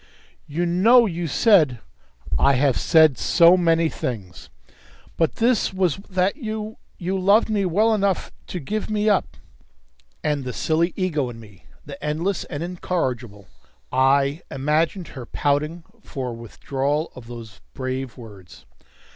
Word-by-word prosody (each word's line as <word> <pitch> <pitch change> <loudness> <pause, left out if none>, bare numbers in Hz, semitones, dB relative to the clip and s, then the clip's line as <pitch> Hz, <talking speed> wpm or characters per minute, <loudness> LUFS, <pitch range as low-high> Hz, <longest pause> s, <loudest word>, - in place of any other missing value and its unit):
"You 165 +4 -2
know 220 +8 +5
you 175 -4 -3
said 155 - +4 0.3
" - - -6
"I - - +4
have 135 -1 +2
said 155 -5 +4
so 170 +1 +5
many 165 -2 +2
things!" 105 - -6 0.7
"But 165 -2 0
this 235 -1 +2
was 185 -5 +1
that 185 +4 0
you 220 -4 -5 0.2
you 185 +2 -2
loved 205 +4 +3
me 205 -2 +1
well 210 +6 +2
enough 200 -3 0 0.2
to 180 - -5
give 210 +9 -4
me 215 0 0
up." 205 -3 +1 0.9
And 150 -2 -1
the 125 -1 -5
silly 165 +2 0
ego 155 -9 -1
in 115 -1 -10
me 105 -4 -16 0.2
the 140 0 -10
endless 165 +6 -1
and 145 -1 -5
incorrigible 125 - -3 0.4
I 140 +4 +2
imagined 155 +6 -1
her 130 -4 -9
pouting 150 +4 -1 0.2
for 135 -9 -5
a - - -5
withdrawal 135 +6 -3
of 125 -2 -12
those 115 -4 -10
brave 130 0 -4
words. 100 -7 -13
155 Hz, 145 wpm, -22 LUFS, 130-185 Hz, 0.9 s, know